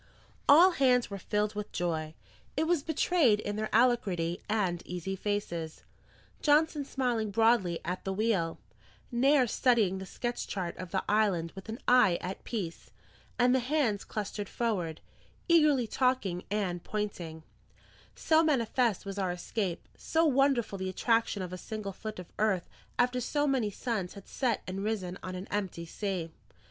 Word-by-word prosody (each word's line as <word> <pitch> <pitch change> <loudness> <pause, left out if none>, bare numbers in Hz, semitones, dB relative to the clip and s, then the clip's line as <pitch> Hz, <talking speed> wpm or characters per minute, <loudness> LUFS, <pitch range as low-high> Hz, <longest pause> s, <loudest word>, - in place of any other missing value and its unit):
All 340 +6 +8
hands 250 - +3
were 200 - -4
filled 210 +3 -1
with 210 0 -5
joy. 160 -3 -2 0.4
It 315 - +2
was 335 -2 +2
betrayed 305 -7 +3
in 205 -1 -3
their 215 0 -2
alacrity 200 -8 +2
and 190 -5 0
easy 180 +2 -4
faces: 185 -5 -3 0.6
Johnson 300 0 +3
smiling 245 -6 -1
broadly 210 -5 +3
at 180 +1 -3
the 195 - -2
wheel, 190 -5 0 0.5
Nares 255 0 +3
studying 220 -7 +2
the 190 - -7
sketch 240 +5 -4
chart 180 -4 -3
of 185 -1 -6
the 190 +1 -1
island 200 -6 +2
with 195 +3 -11
an 220 - -4
eye 245 -8 +5
at 185 +1 -6
peace, 190 -8 -5 0.5
and 245 0 +4
the 260 - +4
hands 250 -6 0
clustered 205 -1 -4
forward, 185 -9 -2 0.5
eagerly 305 -7 +5
talking 220 -7 0
and 190 -4 -1
pointing: 175 -7 -4 0.7
so 320 0 +3
manifest 245 - +1
was 195 0 -5
our 190 -2 0
escape, 180 0 -3
so 325 +1 +1
wonderful 270 -8 +2
the 190 0 -2
attraction 225 0 +1
of 180 0 -6
a 185 - -5
single 210 -1 -5
foot 215 +3 -7
of 180 -1 -10
earth 205 -5 +1 0.3
after 250 0 +2
so 290 +4 0
many 260 -7 +1
suns 205 -3 -3
had 200 - -11
set 245 -5 -1
and 190 +1 -4
risen 195 -4 -2
on 185 0 -5
an 185 +2 -6
empty 190 -5 -3
sea. 180 -2 -3
210 Hz, 155 wpm, -30 LUFS, 185-250 Hz, 0.7 s, All